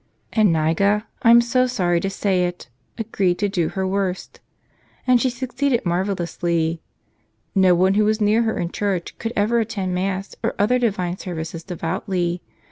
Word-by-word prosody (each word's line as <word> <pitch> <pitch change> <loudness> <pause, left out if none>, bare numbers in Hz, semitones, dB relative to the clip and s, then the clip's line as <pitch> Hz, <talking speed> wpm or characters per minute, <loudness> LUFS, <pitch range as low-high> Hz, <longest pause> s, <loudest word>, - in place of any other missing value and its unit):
And 215 -3 +4
Niga 165 +6 +2
— - - -41
I'm 235 -1 +7
so 255 +2 +2
sorry 180 -8 +1
to 195 - -2
say 195 -2 +1
it! 175 -6 -8
— - - -43
agreed 200 -5 0
to 205 - 0
do 180 -5 0
her 190 -1 -2
worst. 190 -1 -2 0.7
And 250 -2 +4
she 260 - +2
succeeded 255 0 -1
marvelously. 170 -2 -1 0.7
No 190 -2 +5
one 185 +2 +3
who 210 +1 +3
was 215 +1 +1
near 215 +2 +3
her 225 -1 0
in 170 0 -2
church 195 -4 -2
could 225 - -3
ever 220 +3 +2
attend 205 -5 -2
Mass 190 +1 -2
or - - -1
other 235 +5 +2
divine 185 -7 -1
services 165 -2 -5
devoutly. 175 0 -2
195 Hz, 170 wpm, -22 LUFS, 175-220 Hz, 0.7 s, I'm